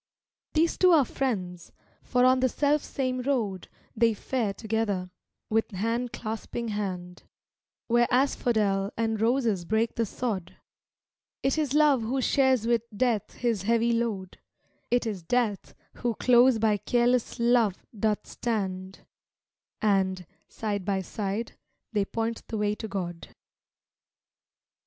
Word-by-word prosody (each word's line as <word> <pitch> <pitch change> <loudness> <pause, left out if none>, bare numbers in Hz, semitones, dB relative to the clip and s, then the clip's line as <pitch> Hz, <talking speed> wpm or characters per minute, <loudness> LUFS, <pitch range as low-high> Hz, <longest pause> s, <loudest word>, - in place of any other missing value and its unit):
These 325 +1 +2
two 365 - +6
are 295 -5 +5
friends, 185 -11 -3 0.3
for 250 0 +2
on 255 0 +5
the 260 0 +3
self 295 +3 +1
same 255 -3 -2
road 230 -9 -1 0.3
They 230 -1 +3
fare 230 -1 -1
together, 205 -4 -2 0.4
with 220 +1 +1
hand 230 +5 -2
clasping 225 0 -4
hand, 185 -4 -4 0.6
Where 240 0 +3
asphodel 220 -6 +1
and 225 -1 0
roses 225 -5 +1
break 220 +5 0
the 230 -1 +1
sod; 200 -6 -4 0.9
'T 275 +4 +2
is 290 -2 -1
Love 295 -4 +5
who 245 +5 -1
shares 260 -3 +3
with 235 -1 +2
Death 220 -1 0
his 230 -5 0
heavy 230 +3 +2
load, 220 -6 -2 0.5
'T 245 -1 +1
is 205 -4 -3
Death 215 +2 -1 0.2
who 240 -2 -1
close 245 +1 +5
by 215 -1 +2
careless 245 +3 +1
Love 235 -5 +2
doth 210 0 0
stand, 190 -5 -3 0.8
And, 190 -3 +1 0.2
side 205 -3 -3
by 195 0 0
side, 205 +4 -3 0.4
they 205 -2 +1
point 225 +2 -3
the 220 - -4
way 210 0 +1
to 220 - -6
God. 175 -4 -5
225 Hz, 130 wpm, -27 LUFS, 200-245 Hz, 0.9 s, two